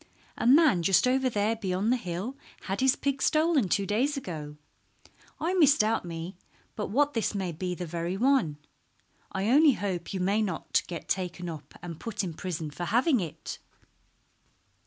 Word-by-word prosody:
"A - - -1
man 275 - +6
just 195 +7 +4
over 260 0 +2
there 215 0 0
beyond 200 0 -1
the - - +4
hill 195 +3 -4 0.3
had 195 +5 -3
his 265 0 +4
pig 275 -1 -2
stolen 310 - +3
two 200 - +1
days 255 +9 0
ago. 155 - -6 0.8
I 335 +4 0
misdoubt 280 - +4
me 170 +1 -6 0.4
but 210 - -3
what 290 +7 +2
this 225 -2 -1
may 190 -3 -2
be 180 +2 -4
the 180 - -5
very 170 +2 -3
one. 245 - +2 0.7
I 190 +2 -2
only 295 +1 +6
hope 185 -6 -3
you 190 - -3
may 200 +4 +1
not 185 -7 0
get 170 -2 -7
taken 180 -1 -2
up 155 -3 -9
and 170 -2 -7
put 225 -2 -3
in 175 -3 -4
prison 160 -3 -4
for 175 +4 -5
having 245 - +3
it." 165 -6 -6
200 Hz, 170 wpm, -28 LUFS, 175-255 Hz, 0.8 s, man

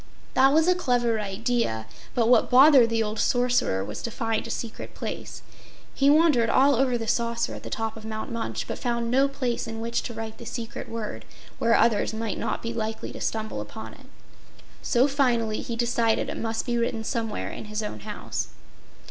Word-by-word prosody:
That 265 +1 +5
was 320 +3 +4
a 365 - +6
clever 245 -9 +1
idea, 200 - -1 0.3
but 235 -2 +3
what 245 - +5
bothered 260 -2 +7
the 225 -1 +1
old 215 0 -3
Sorcerer 245 - +2
was 105 - -6
to - - -3
find 225 0 -2
a - - -8
secret 230 -1 -6
place. - - -6 0.5
He 275 0 +3
wandered 295 -7 +5
all 275 +4 +5
over 250 0 +2
the 225 -1 -5
Saucer 235 0 0
at - - -8
the - - -8
top 225 -1 -3
of 220 - -10
Mount 220 +4 -5
Munch, 115 - -3
but - - -5
found 235 -1 -1
no 270 +2 +4
place 255 -4 -2
in 225 0 -5
which 230 +1 -1
to 240 - -6
write 220 0 -6
the 235 - -9
secret 230 -1 -6
word 225 -2 -5 0.4
where 230 0 +4
others 220 -1 +2
might 220 -2 -3
not - - -2
be 230 0 -3
likely 220 -1 -3
to - - -9
stumble 220 -1 -2
upon - - -8
it. - - -16 0.7
So 250 +2 +3
finally 240 -6 +1
he 235 - -4
decided 230 -1 +1
it - - -4
must 225 0 -2
be 240 -1 0
written 230 -1 -1
somewhere 225 -2 -3
in - - -7
his 215 +1 -3
own 160 - -5
house. - - -4
230 Hz, 200 wpm, -26 LUFS, 220-245 Hz, 0.7 s, bothered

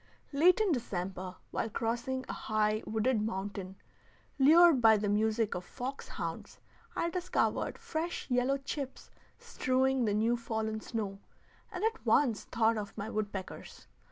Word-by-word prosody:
Late 335 +7 +5
in 425 -4 +2
December, 185 - -3 0.2
while 225 - -1
crossing 240 +4 -2
a - - -4
high, 215 0 0
wooded 220 +1 +1
mountain, 195 -2 -4 0.6
lured 320 0 +7
by 220 -2 +7
the 205 0 -1
music 215 +1 +1
of 180 - -4
fox 255 +8 -6
hounds, - - -6 0.4
I 340 - 0
discovered 365 0 0
fresh 330 +2 -4
yellow 250 +2 +2
chips 275 0 -6 0.3
strewing 260 0 +1
the 205 -1 +1
new 225 +3 +2
fallen 220 -2 -2
snow, 205 -4 -4 0.5
and 365 +2 -5
at 450 +1 0
once 240 -8 +2
thought 225 -1 +2
of 205 -1 -7
my 210 +3 -4
woodpeckers. 205 -3 -5
230 Hz, 140 wpm, -32 LUFS, 210-270 Hz, 0.6 s, lured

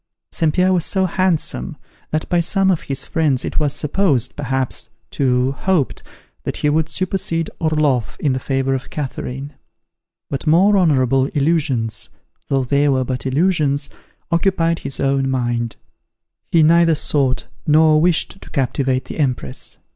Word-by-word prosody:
St. 160 -2 +1
Pierre 185 +3 +2
was 175 -3 +1
so 190 +1 0
handsome, 175 - -1 0.3
that 155 0 -2
by 175 - +2
some 190 +3 +3
of 175 - 0
his 135 -1 -3
friends 150 -6 0
it - - -1
was 150 -2 +1
supposed, 150 - 0
perhaps, 130 -2 -2 0.2
too, 130 -1 +1
hoped, 160 +1 0 0.4
that - - -3
he 150 - +1
would 160 +1 +1
supersede 175 -3 -1
Orloff 150 -7 0
in 140 -4 +1
the 130 - -1
favor 135 0 -1
of 130 -1 -4
Catherine. 135 0 -5 0.7
But 140 +2 -4
more 185 +7 +5
honourable 135 -7 +3
illusions, 140 -7 0 0.4
though 135 -1 +1
they 140 +3 +2
were 130 -2 +1
but 130 +1 -3
illusions, 145 -1 +1 0.4
occupied 170 -1 +1
his 135 0 -6
own 135 0 +1
mind. 120 -3 -1 0.8
He 165 -2 +5
neither 165 +1 +5
sought 140 -4 0 0.2
nor 155 0 +5
wished 175 +3 0
to - - -12
captivate 130 -1 0
the - - -8
Empress. 125 - -2
145 Hz, 145 wpm, -19 LUFS, 130-165 Hz, 0.8 s, more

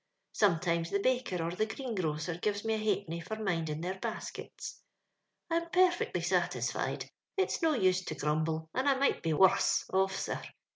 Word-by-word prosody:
Sometimes 170 -3 +2
the 200 - +1
baker 245 -7 0
or 165 - -1
the 215 +5 0
greengrocer 185 - -2
gives 205 +2 -1
me 225 - +1
a 220 - 0
ha'penny 200 -6 -1
for 220 +6 -5
minding 165 -7 -1
their 185 +2 -3
baskets. - - -6 0.3
«< - - -52
I'm 335 0 0
perfectly 360 0 +3
satisfied; - - 0 0.3
it's 385 - +1
no 320 -2 +3
use 185 -4 +3
to 155 - -4
grumble, 155 +2 0
and 265 +2 +2
I 275 - +4
might 275 +1 +2
be 165 -1 0
worms 190 +4 +4
ofi*, 190 0 +2
sir. - - -3
190 Hz, 165 wpm, -32 LUFS, 165-235 Hz, 0.3 s, I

